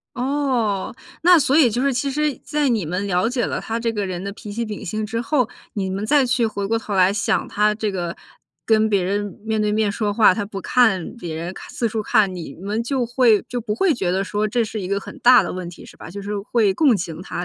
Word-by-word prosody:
哦， 250 -7 -1 0.3
那 355 +1 +7
所 275 0 +2
以 285 -6 +6
就 235 +3 -1
是 280 0 +2
其 255 +3 -1
实 300 +2 0
在 295 -1 0
你 220 -8 0
们 180 +5 -2
了 185 +2 +1
解 245 -1 -1
了 - - -2
他 225 +1 -3
这 230 -1 -1
个 205 -3 -2
人 180 -1 -4
的 200 - -4
脾 210 0 -9
气 230 +3 -2
秉 210 -1 -6
性 215 +4 -2
之 225 +2 -3
后， 250 -1 +1 0.2
你 190 -2 -3
们 195 +3 -3
再 290 +2 +4
去 245 -1 +1
回 200 -2 -3
过 225 +1 +1
头 215 -2 -5
来 185 0 +4
想 205 - 0
他 210 0 +2
这 215 0 -2
个 175 -3 -4 0.5
跟 220 -1 +3
别 200 -3 +2
人 200 +2 -2
面 220 -1 0
对 210 0 +1
面 215 -1 +1
说 205 0 -2
话， 215 -3 +6
他 205 +2 -2
不 200 -1 -6
看 220 -2 +2
别 170 -9 -6
人， 170 +3 -4
看 - - -11
四 235 - -1
处 220 0 -2
看， 210 -2 +2
你 175 -3 -7
们 205 +5 -3
就 260 0 0
会 240 -3 +3
就 245 - -3
不 215 -2 -3
会 350 - +2
觉 190 -10 -1
得 190 +1 +1
说 210 +2 -1
这 235 +2 0
是 215 0 -5
一 185 - -4
个 200 +1 -1
很 285 - -10
大 250 -1 +7
的 - - -4
问 180 -1 -5
题， 175 - -12
是 - - -14
吧？ - - -10
就 200 +3 -7
是 205 +1 -3
会 210 0 +1
共 265 +1 +3
情 170 -3 -5
他， 180 - -5
215 Hz, 280 characters per minute, -21 LUFS, 195-240 Hz, 0.5 s, 那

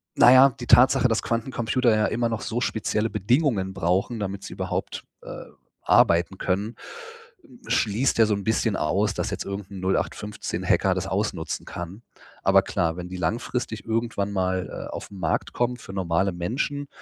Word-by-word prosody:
naja, 130 +2 +8
die 120 - -7
Tatsache, 130 0 +6
dass 115 -2 0
Quantencomputer 120 0 0
ja 110 0 +2
immer 120 +1 0
noch 115 -1 -3
so 120 +2 -3
spezielle 110 -1 -1
Bedingungen 110 - +1
brauchen, 95 +7 0
damit 100 -1 -4
sie - - -7
überhaupt, - - -4 0.2
äh, - - -8 0.4
arbeiten 85 +3 +3
können, 100 +6 -2 0.7
hm, 270 -7 -18
schließt 115 +5 +1
ja 115 - +7
so 105 -1 +1
'n 100 - -5
bisschen 110 -1 +1
aus, 95 +6 +1
dass - - -2
jetzt - - -3
irgend 100 0 -6
'n 95 - -7
0815 100 +2 -2
Hacker - - +3
das - - -3
ausnutzen - - -2
kann. 90 +6 -8 0.4
Aber 95 0 +5
klar, 85 -4 -1
wenn 90 0 -6
die 95 - -6
langfristig 110 +5 -3
irgendwann 115 -3 -1
mal, 95 -1 -1 0.2
äh, - - -8
auf - - -7
'n 100 - -10
Markt 90 - -1
kommen 125 0 0
für 95 - -11
normale 95 0 0
Menschen, 135 - -3
105 Hz, 175 wpm, -25 LUFS, 95-120 Hz, 0.7 s, naja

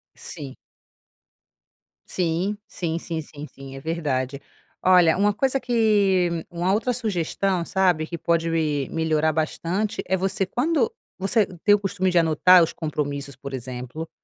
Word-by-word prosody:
Sim. 140 -6 -8 1.5
Sim, 180 +4 -1
sim, 165 -2 -3
sim, 165 -2 -4
sim, 150 0 -10
sim, 135 0 -11
é - - -7
verdade. 140 -4 -2 0.4
Olha, 180 -2 +5
uma 205 +1 +3
coisa 270 +4 +1
que 205 -7 +2 0.2
uma 175 +2 0
outra 245 +4 +1
sugestão, 195 -4 -1
sabe, 180 -5 +1
que 170 - -5
pode 165 0 0
melhorar 155 0 0
bastante, 170 +6 -1
é 190 - +2
você 190 +1 -1
quando 255 - 0 0.3
você 200 +2 +2 0.2
tem 205 - +6
o - - -2
costume 195 -1 -1
de 175 - +1
anotar 170 +2 +6
os 165 - -1
compromissos, 145 -3 -4
por 140 +1 -8
exemplo, 130 +5 -6
170 Hz, 140 wpm, -24 LUFS, 155-195 Hz, 1.5 s, tem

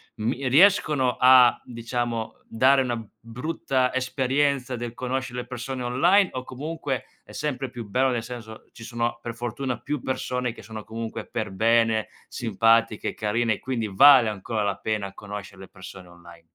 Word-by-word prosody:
mi 125 +5 -2
riescono 150 -5 +4
a, 125 -1 +6
diciamo, 120 -1 -4
dare 135 +4 +4
una 120 -3 -2 0.2
brutta 125 +2 -2
esperienza 130 0 0
del 120 -1 -5
conoscere 130 -1 -3
le 125 - -10
persone 125 +1 -5
online 175 +11 +3
o 130 0 -4
comunque 140 0 -4 0.2
è - - -16
sempre 135 -3 -3
più 120 -3 -8
bello 130 +6 +2
nel 120 -2 -2
senso, 115 -2 -9
ci 115 - -12
sono 120 0 -3
per 115 - -5
fortuna 120 +1 -4
più 150 -3 -4
persone 125 -1 -2
che 115 - -13
sono 110 -1 -8
comunque 115 0 -6
per 110 -3 -4
bene, 115 +2 +2 0.2
simpatiche, 115 -1 +1
carine 110 +2 0
e - - -6
quindi 120 -4 -3
vale 125 +4 +7
ancora 105 +1 -3
la 100 -1 0
pena 105 -3 -3
conoscere 100 -2 -9
le 95 - -10
persone 95 0 -12
online? 85 -1 -15
120 Hz, 160 wpm, -25 LUFS, 110-130 Hz, 0.2 s, vale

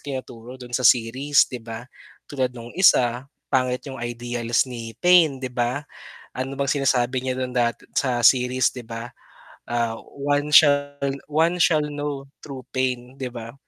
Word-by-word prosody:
tinuturo 130 -2 -8
doon 120 -1 -11
sa 130 - -3
series, 130 +5 +3
'di 125 -2 -7
ba? 115 +1 -7 0.4
Tulad 130 -3 -1
nung 115 0 -9
isa, 125 -9 +4 0.3
pangit 125 -1 +1
yung 135 - -7
ideals 120 0 -1
ni 115 -2 -7
pain, 175 -5 +5
'di 130 - -3
ba? 125 +4 -1 0.5
Ano 130 +2 -4
bang 140 -1 +1
sinasabi 130 -2 +1
niya 130 -1 -2
dun 130 -1 -3
dat 120 -2 +2 0.2
sa 125 -3 +1
series 125 +1 +4
'di 125 - -9
ba? 115 +1 -6 0.6
Ah, 115 -1 -1 0.2
one 145 +1 0
shall 145 -2 +5 0.3
one 160 +4 +2
shall 155 -2 +3
know 145 -1 -4
true 135 -3 -9
pain. 130 0 -2
'Di 130 - -2
ba? 115 0 -8
130 Hz, 160 wpm, -23 LUFS, 120-140 Hz, 0.6 s, pain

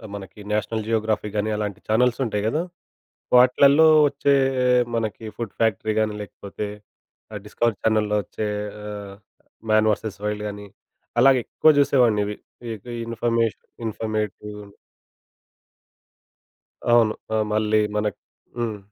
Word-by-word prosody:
మనకి 100 0 -10
national 105 +1 -1
Geography 110 -2 0
గాని 105 +1 0
అలాంటి 105 -2 -3
ఛానెల్స్ 120 +3 +2
ఉంటాయి 105 -3 -2
గద. 115 - 0 0.8
వాట్లల్లో 140 +5 +6 0.2
వచ్చే 140 0 +2 0.6
మనకి 115 -1 -3
ఫుడ్ 115 -4 -5
ఫ్యాక్టరీ 110 -1 +1
కానీ. 110 -1 0
లేకపోతే 100 +1 -7 0.7
ఆ - - -6
డిస్కవర్ 115 0 -1
ఛానెల్‌లో 105 -1 +1
వచ్చే 105 +3 -4 0.4
ఆహ్, 100 -1 -7 0.6
మ్యాన్ 110 0 +4
వెర్సస్ 105 -1 -4
వైల్డ్ 105 0 -2
కానీ 105 0 -8 0.5
అలాగే 130 +1 +6
ఎక్కువ 155 - +3
చూసేవాడిని. 125 -7 +3
ఇవి 105 0 -4 0.3
ఇన్ 115 0 -7 0.2
ఇన్ఫర్మేషన్ 115 -1 -1 0.2
ఇన్ఫర్మేటివ్ 110 -1 -4 2.3
అవును. 115 -2 +5 0.2
ఆహ్, 110 -1 +2
మళ్ళీ 110 0 +2 0.2
మనకు 105 0 -1 0.4
హ్మ్. 115 -3 -2
110 Hz, 115 wpm, -23 LUFS, 105-115 Hz, 2.3 s, వాట్లల్లో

